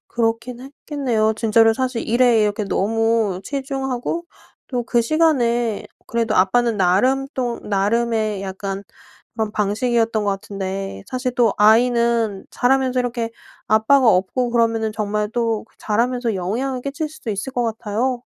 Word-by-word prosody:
그렇긴 230 +1 -2
했겠네요. 260 -5 -1
진짜로 225 0 +4
사실 255 -2 -2
일에 240 -1 +4
이렇게 210 0 0
너무 220 -1 0
치중하고 270 +3 -3 0.4
또 250 -2 -2
그 240 -1 +2
시간에 240 -6 +1 0.2
그래도 230 -1 -1
아빠는 230 +5 +3
나름 205 +9 +2
또 245 -2 -2
나름의 215 +1 0
약간 195 0 -5 0.5
그런 220 -2 -2
방식이었던 225 +1 0
것 205 - +1
같은데 195 - -5
사실 255 -1 -3
또 235 -4 +3
아이는 230 -1 +3
자라면서 260 0 +1
이렇게 240 -2 -2 0.4
아빠가 230 +5 +4
없고 215 +7 +1
그러면은 225 -2 +1
정말 210 -1 -2
또 230 -2 0
그 - - -33
자라면서 235 +1 0
영향을 245 +8 -2
끼칠 285 +3 -3
수도 300 -6 -8
있을 205 +6 -4
것 245 - 0
같아요. 230 +3 -2
230 Hz, 315 characters per minute, -20 LUFS, 210-250 Hz, 0.5 s, 진짜로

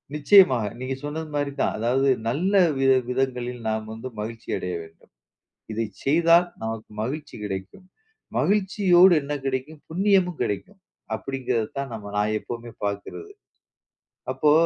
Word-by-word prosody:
நிச்சயமாக. 150 - +6 0.2
நீங்க 130 +1 -3
சொன்னது 155 +2 -4
மாரி 145 -1 0
தான். - - +1
அதாவது 130 +5 +2 0.2
நல்ல 170 - 0 0.2
வித 135 0 +4 0.2
விதங்களில் 125 -2 -2
நாம் 110 0 -2
வந்து 115 +3 -7
மகிழ்ச்சி 115 +2 -6
அடைய 90 -1 -4
வேண்டும். 80 0 -19 0.6
இதை 115 +1 -1 0.2
செய்தால் 170 +4 +5
நமக்கு 110 -1 -5
மகிழ்ச்சி 145 +7 -4
கிடைக்கும். 95 - -6 0.5
மகிழ்ச்சியோடு 190 -3 +5
என்ன 145 +1 -4
கிடைக்கும்? 135 +3 -3
புண்ணியமும் 185 -1 +2
கிடைக்கும். 190 - -3 0.4
அப்படிங்கிறதைத்தான் 130 +2 -3
நம்ம 100 -2 -7
நான் 105 +1 +1
எப்பவுமே 120 +1 -7
பார்க்கிறது. 100 - -4 1.0
அப்போ, 150 - +3
135 Hz, 125 wpm, -24 LUFS, 115-165 Hz, 1.0 s, நிச்சயமாக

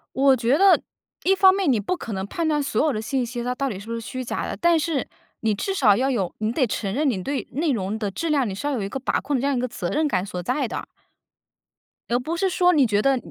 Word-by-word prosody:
我 270 0 +5
觉 250 +4 +2
得， 390 +1 +6 0.4
一 385 - +4
方 380 -1 +6
面 385 -6 +1
你 235 - +2
不 210 - -2
可 230 - -7
能 190 -1 -3
判 330 +9 -2
断 300 -1 +1
所 285 - 0
有 305 - +2
的 215 - -2
信 250 +3 -1
息 240 0 -5
它 250 +1 -1
到 275 +2 -1
底 205 -7 -5
是 200 - -11
不 230 - -4
是 230 - -3
虚 255 +3 -5
假 - - -3
的， - - -4
但 340 -1 +4
是， 310 -4 -1 0.3
你 220 -2 +1
至 390 - -2
少 230 - +4
要 265 +4 +1
有 195 -9 -1
你 215 0 -1
得 260 +1 +2
承 200 -3 -3
认 290 +6 +1
你 200 -8 -1
对 275 +7 -3
内 300 +5 0
容 205 -4 -1
的 210 -3 -2
质 330 - -3
量， 280 -6 +2
你 - - -3
是 205 - -5
要 290 - 0
有 245 -6 -2
一 195 - -3
个 270 - -4
把 265 - -1
控 280 +1 -1
的 - - -1
这 275 - -1
样 280 -1 +1
一 - - 0
个 250 - -1
责 195 -7 -4
任 305 +1 +1
感 185 -7 -1
所 180 -3 -5
在 255 - -1
的。 - - -5 1.3
而 - - +4
不 315 +7 -3
是 380 +2 +1
说 360 0 +3
你 295 -5 +4
觉 205 -2 +1
得 270 +4 +3
255 Hz, 315 characters per minute, -23 LUFS, 215-300 Hz, 1.3 s, 得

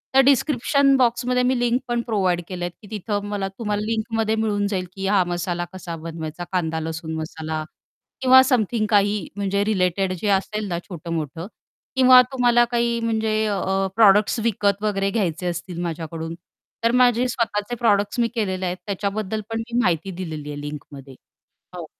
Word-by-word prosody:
तर - - +7
डिस्क्रिप्शन 275 0 +3
बॉक्समध्ये 250 0 +2
मी 255 0 +2
लिंक 245 +1 +2
पण 240 0 0
प्रोव्हाईड 190 -7 0
केले 180 -2 -4
आहेत, 175 - -4
की 205 - -13
तिथं 205 -1 -3
मला 200 -2 -2
तुम्हाला 210 -3 -2
लिंकमध्ये 225 0 -1
मिळून 210 -2 0
जाईल, 190 -3 -2
की 195 0 -3
हा 195 -2 +4
मसाला 175 0 -2
कसा 175 -3 -6
बनवायचा 165 +1 -6
कांदा-लसूण 160 -2 -2
मसाला 155 0 -4 0.6
किंवा 260 0 +8
समथिंग 235 -4 +1
काही 205 -2 +2
म्हणजे 200 0 0
रिलेटेड 190 -2 +1
जे 210 - -1
असेल 205 +2 0
ना 170 -2 -2
छोटं-मोठं 165 -1 -5 0.5
किंवा 255 -1 +8
तुम्हाला 240 -2 +4
काही 235 0 +1
म्हणजे 220 -1 0
अ, 195 -1 0
प्रॉडक्ट्स 210 +1 +5
विकत 205 -2 +1
वगैरे 195 -2 0
घ्यायचे 180 -5 -1
असतील 175 0 -4
माझ्याकडून, 165 -1 -4 0.5
तर 230 - +3
माझे 250 0 +4
स्वतःचे 230 -1 -2
प्रॉडक्ट्स 205 -2 +1
मी 235 - +3
केलेले 190 -4 -1
आहेत. 180 0 -2
त्याच्याबद्दल 205 +1 -2
पण 225 0 -2
मी 240 +1 0
माहिती 175 0 0
दिलेली 160 -5 -6
आहे 145 - -6
लिंकमध्ये. 145 -2 -9 0.6
हो. - - -6
200 Hz, 160 wpm, -22 LUFS, 175-230 Hz, 0.6 s, किंवा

